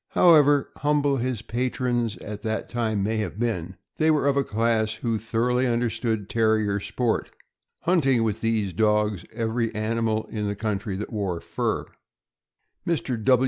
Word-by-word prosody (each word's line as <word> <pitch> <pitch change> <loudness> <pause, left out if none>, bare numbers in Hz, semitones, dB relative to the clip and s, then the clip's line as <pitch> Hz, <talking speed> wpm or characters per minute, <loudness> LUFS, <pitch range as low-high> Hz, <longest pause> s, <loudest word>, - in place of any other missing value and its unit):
However 145 -5 +6
humble 145 -1 +2
his 120 -3 -2
patrons 120 -1 -1
at 105 -1 -7
that 110 -1 -2
time 110 -4 -1
may 110 +2 0
have 105 -1 -3
been, 95 -6 -2 0.2
they 160 0 +3
were 150 -3 +3
of 140 -1 +3
a 140 - +2
class 110 -1 +1
who, 115 0 -2
thor 115 +2 0
oughly 125 0 +2
understood 115 -3 -1
Terrier 110 -3 +2
sport 115 +3 -1 0.3
— - - -56
hunting 135 -9 +3
with 110 -2 -1
these 110 -4 0
dogs 105 -1 +1
every 115 0 -1
animal 110 0 0
in 105 -2 -2
the 100 - -2
country 100 -1 -2
that 105 +3 -5
wore 95 -5 -2
fur. - - -2 1.0
Mr. 140 - -1
115 Hz, 155 wpm, -25 LUFS, 105-125 Hz, 1.0 s, However